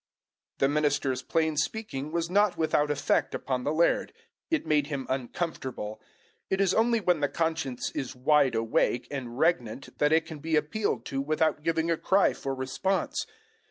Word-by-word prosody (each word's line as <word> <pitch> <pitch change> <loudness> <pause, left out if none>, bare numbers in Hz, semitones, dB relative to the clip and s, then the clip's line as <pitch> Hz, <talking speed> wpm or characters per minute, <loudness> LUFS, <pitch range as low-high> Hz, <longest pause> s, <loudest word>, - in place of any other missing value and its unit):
The 135 - +3
minister's 145 -3 +1
plain 160 -2 0
speaking 155 -6 -2
was 170 0 -1
not 200 +2 +2
without 150 -2 +2
effect 145 -1 +1
upon 130 -2 -2
the 145 - 0
laird. 165 +2 +2 0.4
It 325 -3 0
made 150 -2 +2
him 140 -3 -4
uncomfortable. 130 -5 -4 0.5
It 190 - 0
is 195 -2 +3
only 230 +1 +3
when 180 -5 +2
the 145 -1 +1
conscience 160 -6 -2
is 130 -2 -4
wide 135 0 +3
awake 115 +2 +1
and 125 -4 -5
regnant 135 -6 0
that 150 0 +3
it 160 0 +3
can 160 -2 -8
be 160 +2 -1
appealed 155 +8 0
to 135 0 -2
without 155 +1 +1
giving 165 +1 0
a 165 - +1
cry 195 +4 +3
for 135 -2 -4
response. 135 +9 -1
150 Hz, 165 wpm, -28 LUFS, 135-165 Hz, 0.5 s, The